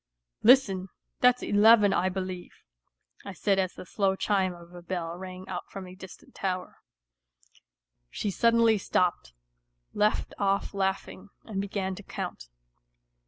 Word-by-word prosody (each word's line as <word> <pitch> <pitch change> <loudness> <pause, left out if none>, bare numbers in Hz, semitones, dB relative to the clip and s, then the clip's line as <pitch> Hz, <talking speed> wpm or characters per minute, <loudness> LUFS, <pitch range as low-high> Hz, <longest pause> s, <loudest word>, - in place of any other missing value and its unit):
" - - -59
Listen! 195 -8 +3 0.3
That's 250 0 +4
eleven, 210 0 +6
I 185 +1 +2
believe," 185 -1 -6 0.6
I 200 - -7
said 195 +1 +1
as 185 -1 -1
the - - -9
slow 190 +2 0
chime 190 -1 +1
of 170 0 -15
a 175 - -10
bell 170 -1 -4
rang 185 +1 -9
out - - -6
from 195 -1 -7
a 180 - -11
distant 190 0 -13
tower. 185 -1 -3 1.3
She 205 - -3
suddenly 230 0 +3
stopped, 175 - 0 0.6
left 210 +1 +1
off 200 0 0
laughing 195 0 -3
and 200 -3 -3
began 195 -1 -3
to 190 - -8
count. 190 - -6
190 Hz, 140 wpm, -28 LUFS, 185-205 Hz, 1.3 s, eleven